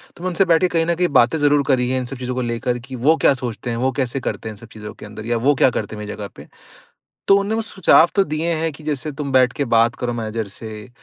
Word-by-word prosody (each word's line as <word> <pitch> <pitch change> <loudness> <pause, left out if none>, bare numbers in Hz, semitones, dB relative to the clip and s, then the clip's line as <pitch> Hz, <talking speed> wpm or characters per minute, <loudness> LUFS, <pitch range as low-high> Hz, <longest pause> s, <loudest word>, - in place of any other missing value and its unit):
तो 175 - -12
मैं 185 - 0
उनसे 185 +2 +2
बैठ 165 -1 +3
के 185 - +4
कहीं 165 -2 0
न 170 - +1
कहीं 180 +1 +1
बातें 125 +7 +4
ज़रूर 145 0 +3
करी 125 -2 +2
हैं 130 0 0
इन 125 - -4
सब 130 +1 -7
चीजों 125 0 -4
को 130 - -1
लेकर 120 +1 -2
कि 130 +2 -9
वो 145 +7 +3
क्या - - +4
सोचते 125 -2 -5
हैं, 115 - -2
वो 130 +2 +1
कैसे 130 0 -2
करते 115 -3 -4
हैं - - -7
इन - - -15
सब 115 +2 -13
चीजों 105 -1 -8
के - - -12
अंदर, 105 +1 -9
या 120 0 0
वो 140 +5 +3
क्या 130 - +4
करते 110 -3 -4
मेरी 105 0 -6
जगह 105 -1 -6
पे। - - -12 0.8
तो 195 - +7
उन्होंने 200 +2 -1
वो 225 - 0
सुझाव 180 -5 +4
तो 195 - +4
दिए 160 +2 -2
हैं 160 0 -1
कि, 150 - -14
"जैसे 150 0 -3
तुम 140 -1 -5
बैठ 130 -1 +4
के 145 -2 -2
बात 115 0 +3
करो 120 -1 -3
मैनेजर 110 -1 -3
से 105 +2 -9
130 Hz, 295 wpm, -20 LUFS, 115-155 Hz, 0.8 s, तो